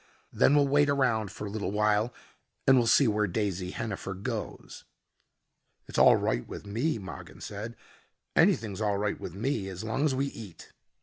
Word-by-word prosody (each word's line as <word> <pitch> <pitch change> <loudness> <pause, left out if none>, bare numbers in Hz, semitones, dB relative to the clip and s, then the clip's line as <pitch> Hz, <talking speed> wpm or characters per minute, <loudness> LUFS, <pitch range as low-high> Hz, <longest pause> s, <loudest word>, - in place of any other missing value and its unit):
"Then 145 - +4
we'll 145 -1 +4
wait 145 +1 +3
around 120 -7 +1
for 105 - -7
a - - -4
little 105 -3 -3
while 105 +2 +2 0.5
and 135 - +7
we'll 120 -2 +3
see 135 +3 +5
where 105 -1 +1
Daisy 95 -2 -2
Hennifer 100 -2 -4
goes." 105 +3 -6 1.0
"It's - - -2
all - - +8
right - - -1
with - - -8
me," 115 +9 -1
Mogin 95 -3 -9
said: 110 +3 -6 0.6
"Anything's 105 -2 +2
all 105 -2 +1
right 105 +1 -1
with 90 - -7
me 110 -2 -1
as 95 +2 -7
long 110 +5 -1
as 140 -4 +1
we 135 +2 0
eat." 105 -11 -9
105 Hz, 175 wpm, -29 LUFS, 100-125 Hz, 1.0 s, all